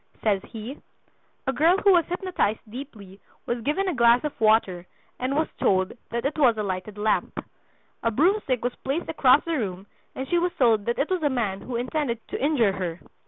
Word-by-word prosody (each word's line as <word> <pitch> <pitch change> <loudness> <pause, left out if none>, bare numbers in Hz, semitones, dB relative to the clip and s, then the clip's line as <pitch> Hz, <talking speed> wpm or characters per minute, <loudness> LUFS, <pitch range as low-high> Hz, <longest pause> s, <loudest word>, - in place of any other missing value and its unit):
Says 205 -3 +2
he: 230 +5 -8 0.6
"A 265 - 0
girl 325 +8 +4
who 400 0 +4
was 345 -4 +4
hypnotized 355 - -1
deeply 210 -5 -10 0.3
was 240 0 -2
given 305 - 0
a 365 - 0
glass 235 0 +4
of 300 - -2
water 200 -5 +2 0.3
and 255 +2 -1
was 315 +1 +1
told 185 0 +2 0.2
that 235 +2 -3
it 300 +2 -1
was 245 -6 +4
a 215 - -1
lighted 195 +1 -4
lamp. 210 +1 0 0.6
A 230 - +1
broomstick 285 - +1
was 245 - 0
placed 285 +6 -2
across 280 -2 +4
the 335 - -2
room 190 -3 -4 0.3
and 265 - -4
she 345 +4 +2
was 355 +1 0
told 225 -5 +3
that 235 - -1
it 290 +6 -1
was 370 -2 0
a 295 - +2
man 215 -7 -2
who 250 - -6
intended 245 0 -2
to - - -4
injure 270 -9 +3
her. 180 -3 -4
245 Hz, 200 wpm, -25 LUFS, 215-300 Hz, 0.6 s, girl